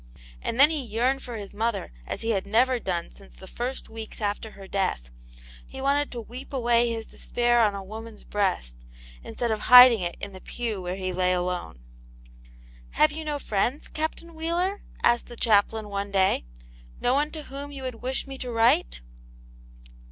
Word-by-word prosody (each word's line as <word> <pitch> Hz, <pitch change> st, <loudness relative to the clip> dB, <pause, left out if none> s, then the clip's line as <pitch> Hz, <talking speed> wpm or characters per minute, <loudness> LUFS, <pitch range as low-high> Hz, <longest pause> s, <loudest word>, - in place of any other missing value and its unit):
And 230 Hz, -, -3 dB
then 290 Hz, +3 st, +8 dB
he 310 Hz, -3 st, -1 dB
yearned 250 Hz, +4 st, 0 dB
for 240 Hz, -2 st, -6 dB
his 205 Hz, -1 st, -8 dB
mother 215 Hz, -, -2 dB
as -, -, -4 dB
he 230 Hz, -, +1 dB
had 195 Hz, -2 st, -1 dB
never 245 Hz, +4 st, +3 dB
done 175 Hz, -5 st, -3 dB
since 195 Hz, -, -13 dB
the -, -, -12 dB
first 245 Hz, +7 st, -5 dB
weeks 220 Hz, 0 st, -8 dB
after 210 Hz, +1 st, -2 dB
her 195 Hz, -1 st, -11 dB
death; 185 Hz, -, -2 dB, 0.6 s
he -, -, -9 dB
wanted 280 Hz, +2 st, +1 dB
to 240 Hz, -, -5 dB
weep 250 Hz, +5 st, -9 dB
away 240 Hz, -3 st, +3 dB
his 225 Hz, -1 st, -5 dB
despair 240 Hz, 0 st, +1 dB
on 210 Hz, -3 st, +3 dB
a 195 Hz, -, -5 dB
woman's 220 Hz, +2 st, -9 dB
breast, 180 Hz, -, -1 dB, 0.4 s
instead 235 Hz, -, -3 dB
of 215 Hz, -, 0 dB
hiding 250 Hz, -1 st, +9 dB
it 175 Hz, -1 st, -3 dB
in 200 Hz, -1 st, -6 dB
the 185 Hz, -, -10 dB
pew 225 Hz, -5 st, -4 dB
where 180 Hz, 0 st, -3 dB
he 185 Hz, -1 st, -3 dB
lay 185 Hz, 0 st, +2 dB
alone. 180 Hz, -, -3 dB, 0.6 s
*' -, -, -23 dB
Have 305 Hz, 0 st, +6 dB
you 315 Hz, +1 st, -5 dB
no 300 Hz, -1 st, -2 dB
friends. 245 Hz, +3 st, -1 dB
Captain 320 Hz, +2 st, -4 dB
Wheeler? 345 Hz, +5 st, -1 dB
" -, -, -21 dB
asked 240 Hz, 0 st, +3 dB
the 240 Hz, -, -10 dB
chaplain, 220 Hz, -1 st, +2 dB
one 200 Hz, 0 st, -3 dB
day; 190 Hz, -, +2 dB, 0.3 s
" -, -, -22 dB
no 245 Hz, -, +2 dB
one 290 Hz, +2 st, +2 dB
to 310 Hz, -1 st, -7 dB
whom 280 Hz, +1 st, -7 dB
you 275 Hz, -2 st, -7 dB
would 250 Hz, -3 st, -5 dB
wish 260 Hz, +1 st, -2 dB
me 270 Hz, -1 st, -8 dB
to 250 Hz, -, -4 dB
write 225 Hz, -, +2 dB
225 Hz, 195 wpm, -26 LUFS, 195-260 Hz, 0.6 s, hiding